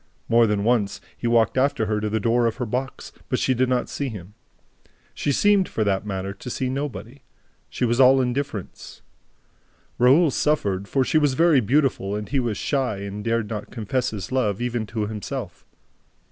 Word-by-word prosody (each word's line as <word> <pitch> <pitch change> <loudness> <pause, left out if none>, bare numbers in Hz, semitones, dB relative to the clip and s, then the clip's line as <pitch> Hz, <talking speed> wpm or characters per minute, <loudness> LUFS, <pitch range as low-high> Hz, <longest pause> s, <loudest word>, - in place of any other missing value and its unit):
More 115 0 +4
than 105 -1 0
once, 105 -3 +1 0.2
he 120 - -3
walked 115 +1 +3
after 140 -4 +1
her 105 0 -1
to 105 - -1
the 110 +1 0
door 115 +2 +2
of 115 - -2
her 125 - -3
box, 125 +4 -4 0.2
but - - +1
she 130 - +1
did 130 +1 +1
not 125 -1 0
see 140 -2 -3
him. 100 -3 -9 0.8
She 145 - -1
seemed, 200 +5 +3
for 110 - -1
that 100 0 -1
matter, 95 0 -3
to 125 - -9
see 130 +1 -2
nobody. 140 -1 -5 0.5
She - - -1
was 120 +1 0
all 135 0 +7
indifference. 125 -5 -4 1.0
Raoul 140 +6 +5
suffered, 100 -12 0
for 135 +3 +1
she 155 - +2
was 145 -3 +1
very 165 -2 +5
beautiful 125 -5 +1
and 105 0 -4
he 140 - 0
was 115 -5 -1
shy 130 -6 -1
and 100 +1 -6
dared 115 -1 0
not 105 -1 -6
confess 125 +3 -2
his 105 -1 -6
love, 110 -7 0
even 120 -2 -2
to 110 -1 -2
himself. 110 -1 -6
120 Hz, 190 wpm, -23 LUFS, 105-130 Hz, 1.0 s, all